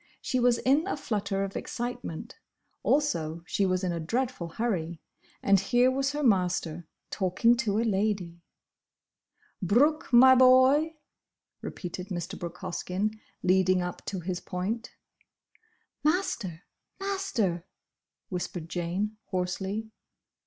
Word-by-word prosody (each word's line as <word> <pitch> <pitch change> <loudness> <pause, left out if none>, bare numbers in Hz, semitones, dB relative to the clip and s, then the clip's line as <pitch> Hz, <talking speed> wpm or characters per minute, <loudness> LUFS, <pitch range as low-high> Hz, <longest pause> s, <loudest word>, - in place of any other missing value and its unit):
She 255 - -1
was 245 -1 +4
in 285 +9 +2
a 395 - -1
flutter 200 -5 -1
of 195 0 -5
excitement; 240 -3 -5 0.4
also 170 - 0
she 195 +2 +1
was 185 0 0
in 180 - 0
a 170 - -2
dreadful 230 +2 -2
hurry—and 185 0 -1
here 245 +6 +3
was 275 +2 0
her 295 0 -2
master, 180 - +1 0.2
talking 205 +5 +3
to 215 -5 0
a 225 - +2
lady! 195 -5 -1 1.2
"'Brooke, 270 - +3
my 260 +2 +9
boy'"—repeated 260 - +1
Mr. 180 0 -4
Brooke 175 0 -6
Hoskyn, 190 +3 -2 0.3
leading 185 0 +3
up 180 0 -5
to 190 -3 -4
his 180 +1 -3
point. 195 +7 -3 1.1
"Master—! 235 - 0 0.4
Master—!" 380 - -1 0.7
whispered 175 -2 -4
Jane, 185 +5 -2
hoarsely. 190 +4 -3
200 Hz, 110 wpm, -28 LUFS, 180-250 Hz, 1.2 s, my